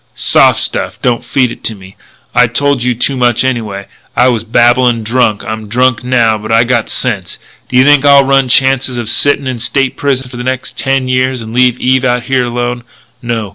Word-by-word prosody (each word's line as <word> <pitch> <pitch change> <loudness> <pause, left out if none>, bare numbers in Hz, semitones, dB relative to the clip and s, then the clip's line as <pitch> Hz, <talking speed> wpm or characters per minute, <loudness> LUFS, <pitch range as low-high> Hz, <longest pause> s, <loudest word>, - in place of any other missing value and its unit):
"Soft - - +3
stuff. - - -2
Don't 120 -2 0
feed 125 0 0
it - - -11
to 110 - -2
me. 95 -1 -15 0.4
I 125 0 +4
told 140 +2 +1
you 125 0 0
too 135 +4 -1
much 120 -2 +1
anyway. 110 -6 -3 0.3
I 125 +1 +4
was 115 -3 -1
babblin' 120 +1 +2
drunk. 110 -2 0
I'm 110 0 -6
drunk 125 +2 0
now, 120 -3 +1
but 110 +1 -7
I 115 +1 +4
got 120 -2 -1
sense. - - -2 0.3
D'you 130 0 +3
think 145 0 +4
I'll 140 -1 +6
run 135 -1 +1
chances 130 -1 +1
of 115 -2 -3
sittin' 145 +1 +1
in 130 -2 -4
State's 135 +3 -1
Prison 135 -2 -1
for 125 - -10
the 125 - -5
next 130 0 -4
ten 135 -1 -1
years 130 -1 -1
and 110 0 -9
leave 125 0 +2
Eve 130 0 +1
out 125 -1 0
here 130 0 0
alone? 120 0 -3 0.4
No. 115 -3 -3
125 Hz, 205 wpm, -11 LUFS, 115-130 Hz, 0.4 s, I'll